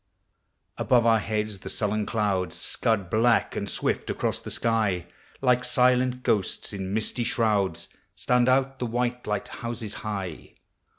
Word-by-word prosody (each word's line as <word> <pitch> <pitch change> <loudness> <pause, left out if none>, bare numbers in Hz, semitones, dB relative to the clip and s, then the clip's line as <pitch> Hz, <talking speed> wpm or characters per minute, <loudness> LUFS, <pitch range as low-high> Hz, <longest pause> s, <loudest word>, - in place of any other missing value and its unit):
Above 120 -2 +3
our 115 -1 +5
heads 105 -2 -2
the - - -7
sullen 105 0 -1
clouds 100 -6 0
Seud 105 -5 0
black 115 +1 +3
and - - -3
swift - - -1
across - - -1
the - - -7
sky: 110 -7 0 0.4
Like 125 -1 +3
silent 125 0 +2
ghosts 100 0 0
in 95 -1 -4
misty 110 +3 -1
shrouds 105 -5 0 0.3
Stand 125 0 +2
out 135 0 +2
the 125 - -1
white 120 +1 -2
light 105 -1 -1
houses 115 -3 -5
high. 100 -6 -5
115 Hz, 140 wpm, -26 LUFS, 105-125 Hz, 0.4 s, our